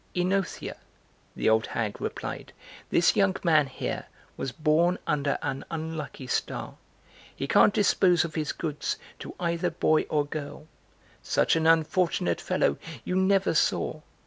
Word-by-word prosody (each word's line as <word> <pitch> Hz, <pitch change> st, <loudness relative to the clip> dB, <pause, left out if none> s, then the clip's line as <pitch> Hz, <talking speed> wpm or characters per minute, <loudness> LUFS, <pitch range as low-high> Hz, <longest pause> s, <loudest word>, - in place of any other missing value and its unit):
"OEnothea," 185 Hz, +1 st, -1 dB, 0.6 s
the -, -, -1 dB
old 110 Hz, 0 st, +3 dB
hag 110 Hz, -3 st, -3 dB
replied, -, -, -5 dB, 0.4 s
"this 170 Hz, -, +3 dB
young 195 Hz, -2 st, +3 dB
man 155 Hz, -5 st, +4 dB
here 135 Hz, -, -4 dB, 0.3 s
was 135 Hz, -, -4 dB
born 165 Hz, +5 st, +2 dB
under 145 Hz, -2 st, 0 dB
an 135 Hz, -2 st, -3 dB
unlucky 160 Hz, -4 st, -5 dB
star: -, -, -2 dB, 0.6 s
he -, -, -3 dB
can't -, -, +5 dB
dispose 180 Hz, -4 st, +4 dB
of 160 Hz, -, -7 dB
his 155 Hz, -2 st, -1 dB
goods 150 Hz, -3 st, -3 dB, 0.2 s
to -, -, -8 dB
either 170 Hz, 0 st, 0 dB
boy 155 Hz, -1 st, +2 dB
or 150 Hz, -1 st, +1 dB
girl. 145 Hz, 0 st, -6 dB, 0.6 s
Such -, -, +2 dB
an 160 Hz, 0 st, +2 dB
unfortunate 165 Hz, -, +2 dB
fellow 70 Hz, -, +1 dB, 0.3 s
you 180 Hz, -, -1 dB
never 190 Hz, 0 st, +3 dB
saw. -, -, +1 dB
160 Hz, 140 wpm, -27 LUFS, 145-180 Hz, 0.6 s, can't